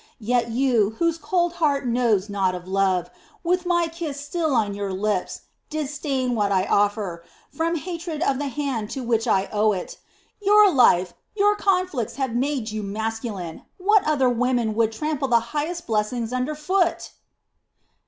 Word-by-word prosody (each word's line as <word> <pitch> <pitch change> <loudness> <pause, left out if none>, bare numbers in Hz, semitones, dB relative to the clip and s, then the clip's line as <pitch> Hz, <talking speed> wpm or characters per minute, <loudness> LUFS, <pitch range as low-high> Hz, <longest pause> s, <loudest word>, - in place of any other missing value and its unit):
Yet 240 +1 0
you, 230 -4 +2
whose 335 -1 +1
cold 345 +2 0
heart 280 -3 +2
knows 230 -5 +1
naught 195 -3 0
of 180 0 -8
love, 190 -2 +1 0.3
with 360 +1 0
my 345 -1 +2
kiss 325 -4 -5
still 300 0 -1
on 205 -3 +1
your 200 -1 -3
lips, 195 0 -2 0.3
disdain 285 -4 -2
what 205 -3 +1
I 190 -1 +2
offer, 205 -5 0 0.3
from 335 +1 -1
hatred 335 -1 -4
of 275 -4 +1
the 290 - -2
hand 265 -6 -3
to 260 - -3
which 230 0 0
I 195 -3 +2
owe 210 0 +3
it. 185 - -6 0.4
Your 410 -1 +6
life, 185 -9 +4 0.2
your 415 0 +3
conflicts 365 - 0
have 265 -4 -2
made 255 -2 -1
you 215 0 -3
masculine. 210 -4 -4 0.2
What 410 +2 +4
other 285 -4 +3
women 245 -2 +1
would 225 0 +2
trample 295 +3 -2
the 235 -2 +4
highest 335 +4 -2
blessings 225 +2 -1
under 255 +4 -1
foot?" 345 +3 0
250 Hz, 160 wpm, -23 LUFS, 215-315 Hz, 0.4 s, Your